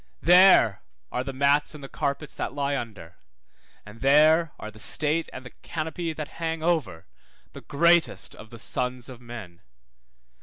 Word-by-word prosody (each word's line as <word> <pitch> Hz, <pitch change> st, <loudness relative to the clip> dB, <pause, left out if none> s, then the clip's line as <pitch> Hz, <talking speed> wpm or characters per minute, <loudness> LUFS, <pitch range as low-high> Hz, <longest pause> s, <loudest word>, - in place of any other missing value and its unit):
There 175 Hz, -, +6 dB, 0.3 s
are 125 Hz, -, -2 dB
the 135 Hz, -, -5 dB
mats 140 Hz, +3 st, +1 dB
and 145 Hz, -, -11 dB
the -, -, -7 dB
carpets 140 Hz, +2 st, -3 dB
that 130 Hz, -, -5 dB
lie 140 Hz, 0 st, -1 dB
under, 105 Hz, -10 st, -7 dB, 0.7 s
and 105 Hz, +2 st, -13 dB
there 155 Hz, +4 st, +4 dB
are 110 Hz, -, -8 dB
the 110 Hz, -, -16 dB
state 155 Hz, +8 st, +1 dB
and 130 Hz, -, -9 dB
the 125 Hz, -, -10 dB
canopy 160 Hz, +1 st, -4 dB
that 155 Hz, -1 st, -6 dB
hang 160 Hz, -1 st, -2 dB
over 160 Hz, -, -1 dB, 0.5 s
the -, -, -10 dB
greatest 170 Hz, +3 st, +2 dB
of 110 Hz, -, -13 dB
the 120 Hz, -, -11 dB
sons 125 Hz, +2 st, -3 dB
of 125 Hz, -1 st, -11 dB
men. 110 Hz, -8 st, -10 dB
140 Hz, 160 wpm, -25 LUFS, 120-160 Hz, 0.7 s, There